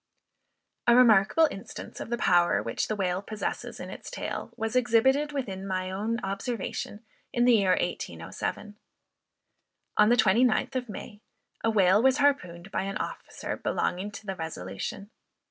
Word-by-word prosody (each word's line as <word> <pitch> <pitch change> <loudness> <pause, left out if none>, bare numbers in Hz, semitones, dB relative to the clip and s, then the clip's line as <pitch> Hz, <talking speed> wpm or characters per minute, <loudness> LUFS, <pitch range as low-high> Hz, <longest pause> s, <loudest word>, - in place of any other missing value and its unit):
A 235 - +7
remarkable 240 +5 +6
instance 195 - -8
of - - -6
the 235 - -1
power 175 -5 +3
which 115 - -2
the 215 - -1
whale 185 -2 -1
possesses 215 +1 -5
in - - -7
its - - -8
tail, - - -5
was 225 +2 -2
exhibited 255 +5 +3
within 195 -9 -4
my 185 -1 -2
own 220 +5 -2
observation, 205 +2 -4 0.3
in 240 0 +2
the 245 - +6
year 195 -4 +4
1807. 210 0 -4 1.2
On 210 +1 +6
the 240 - +6
29th 220 +4 +3
of 250 -2 -2
May, 210 +1 -8 0.4
a 225 - +3
whale 200 -1 +4
was 265 +2 +4
harpooned 195 -11 0
by - - 0
an 195 +2 -3
officer - - -5
belonging 185 +3 -1
to 210 +1 -10
the 195 -1 -3
Resolution. 160 - -6
210 Hz, 150 wpm, -28 LUFS, 190-240 Hz, 1.2 s, A